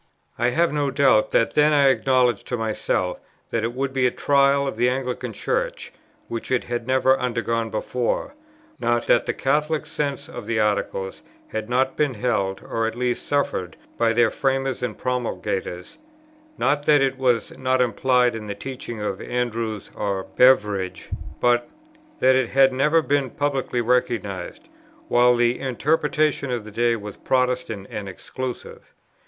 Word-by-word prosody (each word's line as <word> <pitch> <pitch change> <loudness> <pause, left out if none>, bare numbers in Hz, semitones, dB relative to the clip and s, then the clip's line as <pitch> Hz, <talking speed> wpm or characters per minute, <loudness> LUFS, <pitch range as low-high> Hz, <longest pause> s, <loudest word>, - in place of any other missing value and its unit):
I 120 +1 +3
have 165 +5 +1
no 145 -2 0
doubt 135 -6 +3
that 115 - +2
then 150 0 +4
I 140 -2 +5
acknowledged 130 -4 +2
to 125 - -2
myself 110 -4 -1 0.3
that 115 - 0
it 115 +1 -1
would 135 +1 -2
be 130 -2 +3
a - - +3
trial 140 +1 +3
of 135 - -3
the 120 +2 +2
Anglican 125 -1 -3
Church, - - -3 0.3
which 115 -1 -5
it 130 - +1
had 120 -1 -4
never 130 0 +3
undergone 115 -2 -1
before, 125 - -2 0.5
not 120 0 +1
that 120 - +3
the - - 0
Catholic 150 +3 0
sense 145 -2 -3
of - - -8
the 115 -1 0
Articles 100 -2 -1 0.3
had 110 0 -4
not 130 +2 +1
been 145 -4 0
held 100 -4 -1
or 115 0 -1
at 115 - -4
least 125 0 -2
suffered 95 - -1 0.2
by 115 -1 +2
their 115 -1 +3
framers 135 -1 -1
and 125 - -3
promulgators, 115 -7 -3 0.6
not 145 +1 0
that 150 -2 +6
it 135 -1 0
was 125 -3 +1
not 130 0 0
implied 125 +1 +2
in 110 -1 -6
the 100 - -4
teaching 125 -1 -7
of 105 -2 -3
Andrewes 115 -4 -3
or 100 -2 -2
Beveridge, 105 -8 +3 0.3
but 120 0 +2 0.5
that 130 0 +5
it 130 -2 +1
had 135 0 +4
never 150 +5 +3
been 140 -2 +1
publicly 135 -3 -1
recognized, 115 -6 -1 0.4
while 125 0 +5
the 120 +1 +2
interpretation 150 +2 0
of 120 -4 -3
the 110 - -9
day 120 +2 +2
was 105 -2 -8
Protestant 125 -5 -1
and 100 -2 -5
exclusive. 125 +7 -7
125 Hz, 160 wpm, -23 LUFS, 115-135 Hz, 0.6 s, that